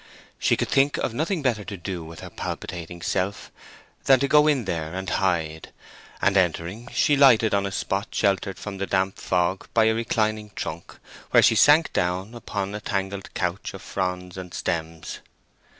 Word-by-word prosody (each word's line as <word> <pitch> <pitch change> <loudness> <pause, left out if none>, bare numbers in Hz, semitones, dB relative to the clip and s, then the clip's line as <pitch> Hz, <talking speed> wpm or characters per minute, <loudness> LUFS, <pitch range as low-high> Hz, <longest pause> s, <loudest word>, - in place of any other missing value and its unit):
She - - +2
could - - -1
think 140 +1 +3
of 115 - -2
nothing 160 - -1
better 115 -6 +1
to 100 +1 -7
do 90 -1 -5
with 80 +1 -10
her - - -9
palpitating 85 -1 -6
self 95 +3 -2 0.5
than 135 -1 +6
to 140 - +2
go 150 +1 +5
in 140 -6 +2
here 80 -4 -3
and 95 +1 -5
hide; 80 -5 -1 0.5
and 100 - +2
entering, 95 +5 0
she 145 - +3
lighted 120 -6 +5
on 100 0 +2
a - - -5
spot 100 +2 -2
sheltered 95 -1 0
from 100 -2 -7
the 100 - -2
damp 95 0 0
fog 90 +1 0
by 115 -1 +5
a 110 - +4
reclining 110 -2 -1
trunk, 80 +2 -6 0.3
where - - +6
she - - +6
sank 145 +9 +5
down 90 +5 -1
upon 100 -4 -4
a 105 - -5
tangled 100 -2 -3
couch 90 +1 -2
of - - -10
fronds 90 -1 -3
and 90 -2 -7
stems. 80 -2 -3
95 Hz, 180 wpm, -24 LUFS, 90-110 Hz, 0.5 s, than